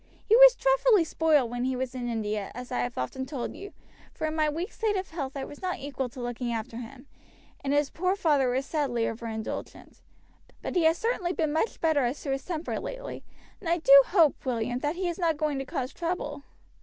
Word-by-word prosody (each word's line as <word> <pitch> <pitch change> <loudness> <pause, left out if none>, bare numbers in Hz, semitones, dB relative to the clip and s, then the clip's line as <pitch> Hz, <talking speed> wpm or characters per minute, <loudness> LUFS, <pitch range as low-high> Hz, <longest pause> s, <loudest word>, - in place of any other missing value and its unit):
He 440 - +5
was - - +9
dreadfully - - +4
spoiled 305 -6 +2
when 245 0 -2
he 260 0 0
was 255 0 -3
in 245 -2 -4
India, 215 -3 -2
as 250 0 -8
I - - -1
have 120 0 -2
often 130 - -3
told 255 -3 -4
you; 400 +1 -9 0.4
for - - -3
in 310 0 -2
my 310 -1 +2
weak 330 +5 -3
state 435 -2 -1
of 375 0 -4
health 280 -4 -4
I 270 - -3
was 290 - -11
not 370 -1 -2
equal 270 -2 -4
to 250 - -11
looking 245 0 -3
after 225 0 -4
him, 250 +3 -9 0.6
and 275 - -1
his 290 -1 +2
poor 365 +3 0
father 295 -9 +2
was 260 +2 0
sadly 275 -8 -1
overindulgent. 225 -1 -5 0.6
But - - -4
he 345 -3 +3
has 325 +1 +4
certainly 385 -6 -1
been 310 -4 0
much 320 +8 0
better 315 -4 +2
as 250 +4 -1
to 275 - -2
his 270 0 -2
temper 340 -2 -3
lately, - - -6 0.4
and 345 - -5
I 340 - +3
do 295 -5 +5
hope, 330 -6 +3
William, 245 -1 -1
that 295 +4 -1
he 365 0 -2
is 345 0 -3
not 330 -4 +1
going 295 -2 -1
to 270 - -4
cause 255 0 -4
trouble." 315 -5 -4
290 Hz, 220 wpm, -28 LUFS, 250-340 Hz, 0.6 s, was